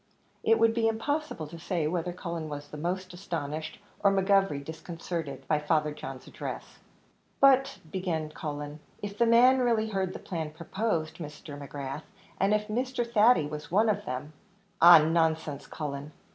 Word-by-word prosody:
It 225 0 +4
would 225 0 +4
be 225 -1 +2
impossible 255 - -2
to 165 +3 -10
say 170 -1 -1
whether 175 +2 -1
Cullen 170 -3 -5
was 145 0 -7
most 180 +4 -3
astonished, 160 -4 -4 0.2
or 200 - +4
McGovery 195 -7 +2
disconcerted, 165 -1 -6
by 150 - +2
Father 150 0 +1
John's 135 -3 -8
address. - - -7 0.6
"But," 270 -1 +5
began 165 -4 -2
Cullen, 150 -1 -5 0.2
"if 205 0 -4
the 235 +2 +3
man 250 +3 +6
really 230 -3 +2
heard 190 -3 -1
the - - -5
plan 160 -4 -4
proposed, 165 0 -2
Mr. 150 -2 -8
McGrath, 140 0 -6 0.4
and 195 +1 +3
if 210 0 +1
Mr. 245 +2 -1
Thady 230 -6 +5
was 150 0 -6
one 215 +5 +3
of 210 - 0
them 130 +4 -5 0.2
" 195 -1 -32
"Ah, 170 +1 +11
nonsense, 160 -2 +1
Cullen." 145 -1 -5
170 Hz, 160 wpm, -29 LUFS, 150-210 Hz, 0.6 s, Ah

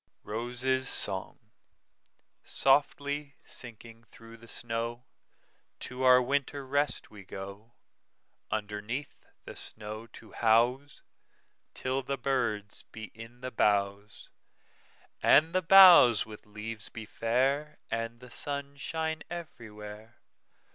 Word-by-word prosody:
ROSES' 125 +4 -1
SONG"SOFTLY 140 +8 -1
sinking 115 -1 -9
through 115 +1 -14
the 115 0 -16
snow, 115 +2 -3 0.8
To 125 +1 -4
our 130 -1 +7
winter 140 +2 -1
rest 145 +2 -1
we 105 -2 -12
go, 100 +4 -9 0.8
Underneath 110 +6 -4 0.2
the - - -9
snow 110 +1 -7
to 115 - -14
houseTill 130 +2 -1
the 140 - -1
birds 105 -7 -1
be 110 -1 -9
in 115 +2 -12
the 130 0 -5
boughs, 100 -1 0 0.9
And 160 +3 +5
the 185 - +2
boughs 175 - +8
with 105 -1 -12
leaves 105 +1 -6
be 115 -2 -8
fair, 135 +7 0
And 115 +1 -3
the 125 -1 -12
sun 140 0 -4
shine 160 +2 -3
everywhere. 110 -10 -9
120 Hz, 100 wpm, -30 LUFS, 110-140 Hz, 0.9 s, boughs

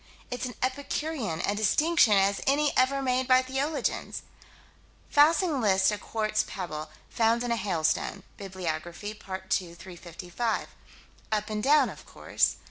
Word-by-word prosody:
It's 250 +1 -3
as 245 - -8
epicurean 260 - -2
a 200 - 0
distinction 220 +5 +3
as 195 0 +3
any 290 +1 +3
ever 275 +2 +2
made 255 0 +1
by 255 0 +5
theologians. 270 +2 -2 0.9
Fassig 305 0 +4
lists 190 -2 +3
a 210 - -3
quartz 215 -1 -1
pebble, 155 -5 -5 0.2
found 230 +1 +1
in 240 - -2
a - - +2
hailstone 185 -7 -1
(Bibliography, 185 0 -5
part 190 -2 -8
2 170 -2 0
355). 175 +5 -4 0.6
"Up 210 0 -1
and 210 0 -2
down," 280 +2 +4
of - - -13
course. - - 0
215 Hz, 135 wpm, -28 LUFS, 190-260 Hz, 0.9 s, by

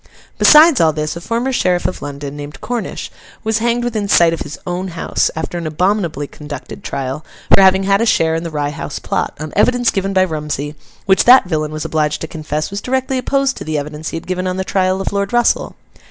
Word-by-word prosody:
Besides 305 - +7
all 160 -1 +4
this, 155 +1 -3
a 170 - -7
former 235 +7 -1
sheriff 180 -6 +1
of - - -2
London, 145 0 -6
named 145 0 -8
Cornish, 240 -2 -4 0.3
was 220 0 0
hanged 235 +1 0
within 220 -4 -2
sight 170 -4 +5
of 165 - -4
his 150 - -6
own 180 +1 -3
house, 170 -2 -1
after 160 +2 -4
an 165 - -4
abominably 170 -2 0
conducted 145 -1 -9
trial, 135 +3 -4 0.3
for - - +8
having 190 0 +5
had 195 +2 +2
a - - +2
share 160 -6 +3
in 165 - -1
the 170 - -5
Rye 145 -2 -2
House 145 - -6
Plot, - - -2
on 155 0 -6
evidence 245 -1 +3
given 195 0 -1
by 190 -1 +3
Rumsey, 150 -4 -3 0.3
which 190 -1 +3
that 250 -1 +8
villain 155 -4 -2
was 155 0 -5
obliged 150 -1 0
to 160 - -3
confess 155 0 -4
was 200 0 -4
directly 260 0 -1
opposed 275 +1 0
to - - -6
the 155 0 -2
evidence 150 +2 -5
he - - -4
had 165 - -8
given 185 0 -2
on 185 0 -2
the 190 - -1
trial 190 0 0
of 195 - -3
Lord 200 0 -1
Russell. 240 0 +2
180 Hz, 225 wpm, -17 LUFS, 155-205 Hz, 0.3 s, for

